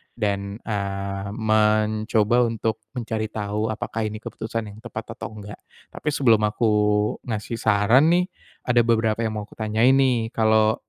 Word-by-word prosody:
dan, 100 -1 -2
eee, 100 -1 -3
mencoba 110 +1 +2
untuk 110 -1 -2 0.2
mencari 110 -2 -2
tahu 105 +1 -2
apakah 110 +1 -4
ini 110 0 -5
keputusan 115 -1 -5
yang 105 - -13
tepat 110 -2 -7
atau - - -6
nggak 105 0 -9 0.4
tapi 150 - -2
sebelum 115 -7 +4
aku 105 +1 +1 0.6
ngasih 110 +1 -3
saran 110 +8 +4
nih 180 0 +3 0.4
ada 120 -1 +4
beberapa 110 -1 +1
yang 110 -1 -2
mau 105 - -6
aku - - -16
tanyain 110 +5 +3
nih 125 -4 +2
kalau, 110 -1 +3
110 Hz, 150 wpm, -23 LUFS, 105-115 Hz, 0.6 s, sebelum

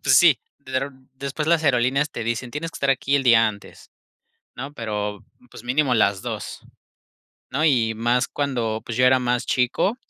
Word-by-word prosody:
pues 130 -1 +5
sí, 165 -6 +6 0.2
de 135 -2 -13
dron 130 0 -4
después 140 +3 -4
las 165 -2 +3
aerolíneas 135 +2 +2
te 115 - -5
dicen: 120 +1 -3
"Tienes 150 +5 -4
que - - -10
estar 140 -1 +1
aquí 135 +2 +1
el 140 - 0
día 115 -3 +5
antes", 100 -2 -11 0.7
¿no? 140 +3 -7
Pero 105 -4 -4 0.3
pues - - -11
mínimo 130 +2 +1
las 100 -4 +2
2, - - -6 0.9
¿no? 140 +4 0
Y 115 -7 +3
más 120 +3 +1
cuando, 120 -6 -2
pues, 115 - -5
yo 125 - +5
era 130 0 +5
más 125 -1 -1
chico 130 - +1
130 Hz, 185 wpm, -23 LUFS, 115-140 Hz, 0.9 s, sí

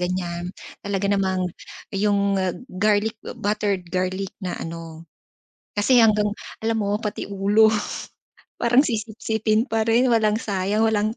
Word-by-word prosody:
ganyan, 175 -1 -2 0.3
talaga 200 0 -1
namang 190 -2 +1 0.5
yung, 200 -1 +2
ah, 185 -2 -1 0.2
garlic 210 +3 +1 0.2
buttered 205 -2 -1
garlic 185 +1 -1
na 185 -3 -3
ano. 165 0 -7 0.7
Kasi 240 +5 +4
hanggang 210 -2 +4 0.3
alam 225 0 +1
mo 205 -1 0
pati 210 - -3
ulo, 200 +2 +4 0.9
parang 245 +4 +4
sisipsipin 220 -2 0
pa 225 -3 -1
rin 235 +3 +4
walang 215 -2 +3
sayang, 205 0 0
walang 215 0 +1
205 Hz, 125 wpm, -23 LUFS, 190-220 Hz, 0.9 s, Kasi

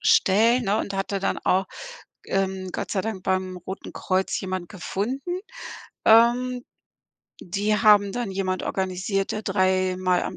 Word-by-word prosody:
stellen, 230 +6 +4
ne 205 +2 +1
und 200 - -3
hatte 195 +1 -2
dann 195 - -1
auch, 190 +1 +1 0.6
ähm, 190 -1 -1
Gott - - -4
sei 195 - +1
Dank 200 -1 -4
beim 185 0 -1
Roten 185 +2 -8
Kreuz 190 0 -1
jemand 185 -2 -4
gefunden. 250 - -3 0.6
Ähm, 240 +2 +4 0.8
die 200 +4 0
haben 205 -2 +5
dann 240 -4 -3
jemand 190 -1 -2
organisiert, 190 +1 -2
der 215 - -3
dreimal 185 -2 +1
am - - -5
195 Hz, 140 wpm, -24 LUFS, 185-215 Hz, 0.8 s, haben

